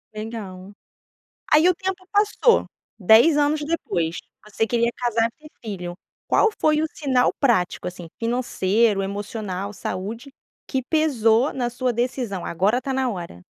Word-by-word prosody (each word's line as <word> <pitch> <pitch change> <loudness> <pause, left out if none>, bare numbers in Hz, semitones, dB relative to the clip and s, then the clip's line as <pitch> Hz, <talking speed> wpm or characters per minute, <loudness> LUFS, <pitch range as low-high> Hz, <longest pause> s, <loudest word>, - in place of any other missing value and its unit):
Legal. 205 -3 -7 0.8
Aí 310 +4 +6
o - - +4
tempo 375 +1 -4
passou, 420 +3 +3 0.3
10 230 - +6
anos 295 +1 +2
depois, 175 - -2 0.3
você 220 +1 -1
queria 235 0 +1
casar 230 -2 +1
e 305 - -13
ter - - -17
filho, 180 -5 -5 0.3
qual 445 - +4
foi 305 0 +3
o - - +1
sinal 260 -4 +2
prático, 225 -13 +1
assim, 175 -2 -8
financeiro, 230 -3 +1
emocional, 200 0 -4
saúde, 215 +7 -5 0.4
que 265 -2 -1
pesou 255 -5 +2
na 245 -2 -1
sua 250 0 -1
decisão? 240 -5 -2
Agora 195 +8 +1
está 270 0 -4
na 260 -1 0
hora. 170 - -7
235 Hz, 140 wpm, -23 LUFS, 200-275 Hz, 0.8 s, Aí